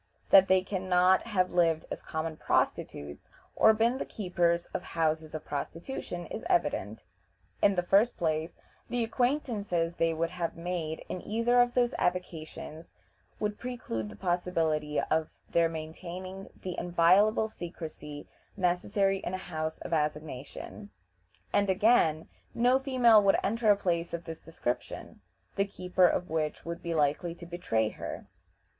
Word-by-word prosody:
That 195 -1 +8
they 185 0 +4
can 190 -1 -4
not 185 +3 +4
have 185 -5 +1
lived 165 -2 +2
as - - -4
common 160 0 -4
prostitutes, 70 - -1 0.3
or 220 - +7
been 230 +4 +2
the - - -1
keepers 175 -4 0
of - - -2
houses 160 -3 -1
of 155 - -6
prostitution, 175 - -5
is - - -6
evident. 105 +1 0 0.6
In 200 - +4
the 180 - +1
first 200 +6 +3
place, 160 0 -1 0.3
the 245 -1 0
acquaintances 225 - 0
they 165 0 +2
would 165 +1 -1
have 170 -2 -3
made 165 -2 -4
in 180 - -5
either 235 +3 +3
of 245 0 +1
those 245 -1 +3
avocations 165 -2 -4 0.4
would 210 0 -2
preclude 170 - -4
the - - -10
possibility 165 -4 0
of 160 0 0 0.2
their 170 -1 +3
maintaining 175 +4 -7
the 185 -1 -3
inviolable 180 +6 +4
secrecy 160 -6 -8 0.3
necessary 195 +2 +1
in 185 - -4
a 185 - -8
house 155 0 -2
of - - -5
assignation; 150 - -3 0.6
and, 200 -1 +3
again, 190 -6 +3 0.3
no 250 +2 +4
female 250 -5 +5
would 195 -1 +4
enter 225 +1 +1
a 205 - +6
place 170 -3 -1
of 170 - -7
this 165 -1 -7
description, 125 -6 -5 0.4
the 195 - +4
keeper 180 -2 +2
of 180 - 0
which 155 -2 -2
would 170 0 -5
be 170 -1 -3
likely 150 +3 +1
to 170 - -11
betray 170 -11 0
her. - - -7
175 Hz, 150 wpm, -30 LUFS, 160-200 Hz, 0.6 s, That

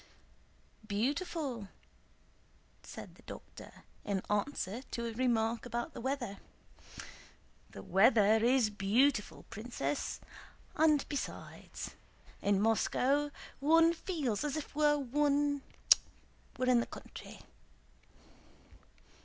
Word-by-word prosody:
"Beautiful," 260 - -2 1.1
said - - -9
the - - -19
doctor - - -11 0.2
in 195 -2 -1
answer 210 0 -1
to 235 - -3
a 230 - -2
remark 230 -1 +1
about 240 +6 -4
the - - -7
weather. 255 -6 -2 1.3
"The 95 - -10
weather 215 - +5
is 245 -3 +4
beautiful, 210 +4 +1
Princess; 200 - -3 0.6
and 305 -2 +4
besides, 285 - -6 0.5
in 200 -1 +2
Moscow 260 +6 +2 0.3
one 330 +4 +5
feels 300 - -2
as 295 +1 -1
if 310 - -6
one 290 0 +2 1.0
were 255 - 0
in 250 -1 +5
the 235 - -1
country." - - -10
250 Hz, 95 wpm, -33 LUFS, 215-290 Hz, 1.3 s, weather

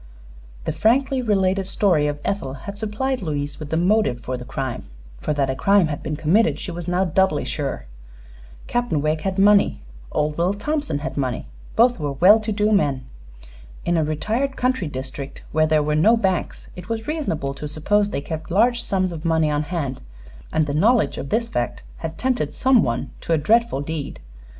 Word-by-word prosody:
The - - 0
frankly 255 - +2
related 195 -4 +1
story 180 -7 +2
of 145 0 -3
Ethel 140 -10 -2
had 200 - -5
supplied 220 +5 -2
Louise 145 -4 -3
with 155 -2 -7
the 160 - 0
motive 180 - +2
for 130 +2 -3
the 125 - -7
crime, 130 -1 -4 0.3
for - - -2
that 140 -2 +1
a - - -3
crime 195 +3 +3
had 145 - -4
been 150 - -3
committed 170 +10 +2
she 185 - -5
was 175 0 -6
now 180 +2 +1
doubly 190 -2 +1
sure. 140 - -3 0.8
Captain 240 -10 0
Wegg 155 +1 0
had 190 +2 -2
money; 200 +1 +4 0.3
old 150 +1 -1
Will 180 +4 +2
Thompson 295 - -2
had 160 - -5
money; 130 -3 -2 0.3
both 240 0 +4
were 145 -2 -2
well 185 +10 +6
to 215 0 -3
do 210 +1 +1
men. 140 -11 +1 0.8
In 175 - +1
a 160 - +2
retired 220 - -1
country 250 -8 0
district, 135 0 -7
where 155 0 +3
there 155 -1 +3
were 150 +1 0
no 210 +10 +5
banks, 190 -5 -2
it 180 +3 -10
was 225 -1 -3
reasonable 255 - -2
to 150 +2 -6
suppose 200 +8 +1
they 140 - -3
kept 160 +2 -6
large 235 +6 +3
sums 185 -4 0
of 165 -2 -7
money 160 -2 +2
on 145 0 +1
hand, 150 -4 -3 0.5
and 160 -1 +2
the 145 - -3
knowledge 215 - +3
of 140 - -6
this 230 +1 +1
fact 120 - -3
had 160 0 -6
tempted 255 -1 -1
some 260 -3 +4
one 120 -3 -2
to 165 - -1
a - - +4
dreadful 225 0 +2
deed. 150 -1 -5
170 Hz, 195 wpm, -22 LUFS, 150-215 Hz, 0.8 s, well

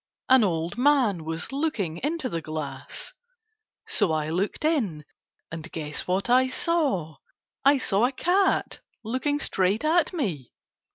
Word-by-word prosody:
An 260 -2 +7
old 170 +1 -1
man 250 - +3
was 160 +6 -4
looking 270 - -1
into 295 - -2
the 165 -9 -3
glass, 155 - -6 0.7
so 205 -6 +1
I 155 0 -1
looked 195 - -1
in, 210 - 0 0.5
and 165 +2 -7
guess 150 -2 -4
what 185 +4 0
I 255 +2 +4
saw. 260 - 0 0.5
I 280 +1 +6
saw 225 -2 +2
a - - -4
cat 370 +7 +1 0.2
looking 260 +6 -1
straight 200 -2 0
at 320 +1 +3
me. 185 - -3
215 Hz, 135 wpm, -26 LUFS, -, 0.7 s, An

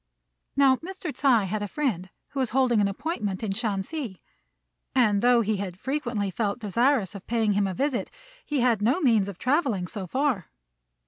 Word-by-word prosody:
Now 270 -2 +5
Mr. 355 -1 -6
Ts'ui 245 -7 +3
had 210 +3 -2
a 205 - -2
friend, 200 - -2 0.2
who 275 - -5
was 255 -3 +1
holding 250 -3 +3
an 200 - +3
appointment 205 - -3
in 210 - -1
Shansi; 215 - -3 0.8
and 215 -6 +3
though 245 -1 +5
he 215 -1 0
had 190 -2 -5
frequently 240 -8 -2
felt 205 +1 -1
desirous 230 0 +1
of 200 -2 -10
paying 225 -3 +1
him 200 0 +2
a 190 - -4
visit, 275 +1 -1 0.3
he 295 - -1
had 235 -4 +2
no 245 - +2
means 225 - +3
of 200 -3 -7
travelling 255 - +1
so 195 -1 -6
far. 260 - 0
225 Hz, 180 wpm, -26 LUFS, 200-270 Hz, 0.8 s, Now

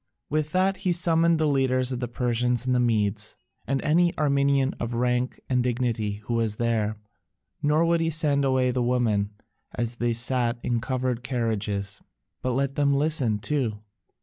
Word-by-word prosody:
With 155 0 0
that 190 +1 +2
he 185 -1 -1
summoned 170 -1 +3
the 155 - +2
leaders 130 -3 +1
of 125 - -3
the 125 - -2
Persians 120 0 -1
and 130 - +1
the 125 - +2
Medes, 110 -3 0 0.3
and 135 +1 0
any 170 +3 +2
Armenian 140 -2 +2
of 120 0 -3
rank 125 +1 0
and 125 -1 +1
dignity 120 -4 -1
who 120 - -3
was 115 -2 0
there, 110 -2 0 0.7
nor 150 +2 +3
would 170 0 +2
he 165 - +1
send 150 -3 +2
away 130 -2 +2
the 125 0 -1
women 120 -5 +1 0.5
as 120 0 -3
they 120 -1 0
sat 120 0 +1
in 120 -1 0
covered 125 0 -2
carriages, 110 -6 -2 0.4
but 130 - -1
let 135 +1 0
them 140 0 +2
listen 140 -7 +2
too. 120 -2 -1
125 Hz, 170 wpm, -25 LUFS, 115-140 Hz, 0.7 s, summoned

